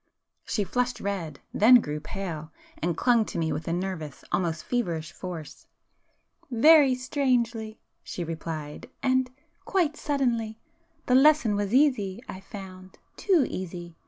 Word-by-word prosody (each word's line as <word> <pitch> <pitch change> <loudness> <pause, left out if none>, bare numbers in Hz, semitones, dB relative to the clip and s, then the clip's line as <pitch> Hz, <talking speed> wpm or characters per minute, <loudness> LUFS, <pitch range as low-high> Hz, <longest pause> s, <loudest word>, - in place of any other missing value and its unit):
She 210 - 0
flushed 250 +4 -1
red,—then 200 - +2
grew 150 -11 +2
pale,—and 165 -1 -5
clung 240 -3 +4
to - - -6
me 160 -1 0
with - - -5
a - - 0
nervous, 175 -4 -4
almost 170 -3 -1
feverish 170 -10 -2
force. 175 -5 -8 0.8
"Very 275 +2 +6
strangely!" 240 -5 -1 0.2
she 175 - -5
replied—"And—quite 255 - -3
suddenly! 240 -8 -1 0.5
The 250 - +1
lesson 270 -5 +5
was 205 -1 -1
easy, 240 -8 +2
I 185 - -7
found;—too 195 - -2
easy! 175 -2 -6
205 Hz, 110 wpm, -27 LUFS, 170-255 Hz, 0.8 s, Very